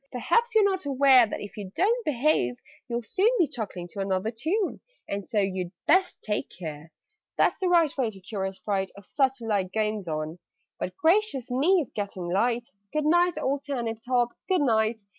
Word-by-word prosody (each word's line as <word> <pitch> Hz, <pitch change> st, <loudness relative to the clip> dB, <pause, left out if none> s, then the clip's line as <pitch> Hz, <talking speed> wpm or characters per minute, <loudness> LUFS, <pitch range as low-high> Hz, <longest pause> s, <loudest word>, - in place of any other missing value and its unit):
Perhaps 450 Hz, -, +1 dB
you're 435 Hz, -, +6 dB
not 380 Hz, -5 st, 0 dB
aware 265 Hz, -3 st, +6 dB
That, -, -, -5 dB
if 205 Hz, -, -8 dB
you 200 Hz, -3 st, -6 dB
don't 460 Hz, +6 st, +2 dB
behave, 265 Hz, -, +1 dB, 0.3 s
you'll 240 Hz, -1 st, -2 dB
soon 390 Hz, -, +2 dB
Be 350 Hz, -, +4 dB
chuckling 200 Hz, -, -6 dB
to 200 Hz, -, -8 dB
another 195 Hz, +2 st, -1 dB
tune 325 Hz, -, -1 dB, 0.3 s
And 200 Hz, -1 st, -4 dB
so 220 Hz, -, 0 dB
you'd 185 Hz, -3 st, -1 dB
best 370 Hz, +3 st, +2 dB
take 210 Hz, -1 st, -2 dB
care!' 160 Hz, -2 st, -8 dB, 0.5 s
"That's -, -, +3 dB
the 375 Hz, -, 0 dB
right 335 Hz, -3 st, +3 dB
way 255 Hz, -5 st, 0 dB
to 200 Hz, -3 st, -11 dB
cure 190 Hz, +1 st, -4 dB
a 190 Hz, -, -3 dB
Sprite 195 Hz, -1 st, -2 dB
Of 200 Hz, -, -12 dB
such 265 Hz, 0 st, 0 dB
like 200 Hz, -5 st, -1 dB
goings 215 Hz, -2 st, -1 dB
on 155 Hz, +2 st, -4 dB, 0.4 s
But -, -, -4 dB
gracious 330 Hz, -, +2 dB
me! 330 Hz, +9 st, +3 dB
It's -, -, -15 dB
getting 200 Hz, -4 st, -4 dB
light! 235 Hz, +6 st, 0 dB, 0.2 s
Good 305 Hz, -1 st, -1 dB
night, 345 Hz, +1 st, +3 dB
old 280 Hz, -1 st, -1 dB
Turnip 240 Hz, -6 st, -3 dB
top, 245 Hz, -1 st, +2 dB, 0.2 s
good 370 Hz, -4 st, +3 dB
night!" 220 Hz, -3 st, +1 dB
235 Hz, 190 wpm, -27 LUFS, 200-310 Hz, 0.5 s, you're